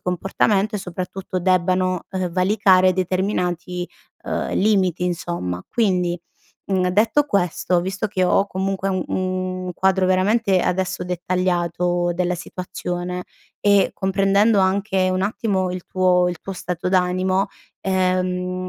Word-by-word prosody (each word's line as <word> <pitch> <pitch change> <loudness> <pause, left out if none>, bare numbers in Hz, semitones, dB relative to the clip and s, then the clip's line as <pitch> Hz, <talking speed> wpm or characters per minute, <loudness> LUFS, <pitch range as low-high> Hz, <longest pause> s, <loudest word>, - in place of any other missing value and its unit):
comportamento 195 +3 0
e - - -3
soprattutto 185 +1 -5
debbano, 185 0 +1
uhm, 185 -2 -2
valicare 185 0 +4
determinati, 180 -1 -1 0.4
uhm, - - -2
limiti 190 -4 +2
insomma, 170 - -3
quindi, 180 -6 +1 0.5
mhmm, 185 -2 +1
detto 225 +10 +3
questo, 180 - +1
visto 190 +4 -2
che 190 -2 -2
ho 195 +2 +3
comunque 195 0 -2
u 185 -2 0
un 185 -1 -2
quadro 190 0 +2
veramente, 190 +1 +2
adesso, 180 0 -1
dettagliato 175 -1 0
della 180 0 0
situazione 180 0 -5 0.4
e 200 -1 +4
comprendendo 195 +2 +2
anche 190 0 +1
un 185 0 0
attimo 195 -3 -1
il 180 -1 -6
tuo 180 -1 +2
il 175 - -4
tuo 195 - -6
stato 180 -1 -4
d'animo, 185 +1 +1 0.3
ehm, 185 -1 -1
185 Hz, 120 wpm, -21 LUFS, 180-195 Hz, 0.5 s, valicare